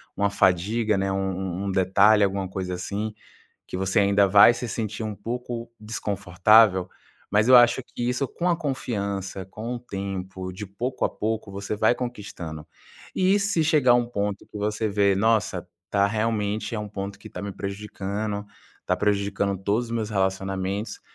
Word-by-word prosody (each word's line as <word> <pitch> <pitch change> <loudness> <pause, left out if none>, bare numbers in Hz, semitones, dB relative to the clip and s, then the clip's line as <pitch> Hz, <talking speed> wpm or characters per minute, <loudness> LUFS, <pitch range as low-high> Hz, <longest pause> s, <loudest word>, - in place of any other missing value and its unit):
uma 100 0 +1
fadiga, 100 +4 +2
né, 95 0 0
um 95 -1 -2
um 100 - -1
detalhe, 100 +3 +4
alguma 95 -1 0
coisa, 95 -1 -4
assim, 105 +4 -4 0.5
que - - -5
você 95 +3 +1
ainda 100 0 +4
vai 100 +4 +8
se 125 - -4
sentir 110 -1 -3
um 110 -1 -3
pouco 120 +2 -5
desconfortável, 105 -2 +3 0.4
mas 105 +4 +3
eu 130 - +9
acho 120 +1 +5
que 120 0 -4
isso 130 +3 0
com 175 +1 -2
a 175 - +2
confiança, 100 - -3
com 110 +5 -5
o - - -6
tempo, 95 -4 -5
de 105 +3 -7
pouco 120 +7 -3
a - - +3
pouco, 110 -1 -3
você 100 +2 -4
vai 110 +3 +3
conquistando. 100 -11 -6 0.5
E 190 +2 +3
se 200 -5 +1
chegar 145 -6 +4
um 120 -1 +2
ponto 105 -4 -3
que - - -11
você 105 +1 -1
vê: 100 -1 +3
"Nossa, 105 -3 +1 0.2
tá 100 -1 +3
realmente 105 0 -1
é - - -2
um 105 0 -5
ponto 100 -1 -6
que - - -11
tá 90 - -7
me 100 -1 -4
prejudicando, 100 +1 -4 0.4
tá - - +1
prejudicando 100 -1 0
todos 110 +5 0
os - - -11
meus 115 -2 -2
relacionamentos", 95 +1 -2
105 Hz, 170 wpm, -25 LUFS, 95-115 Hz, 0.5 s, eu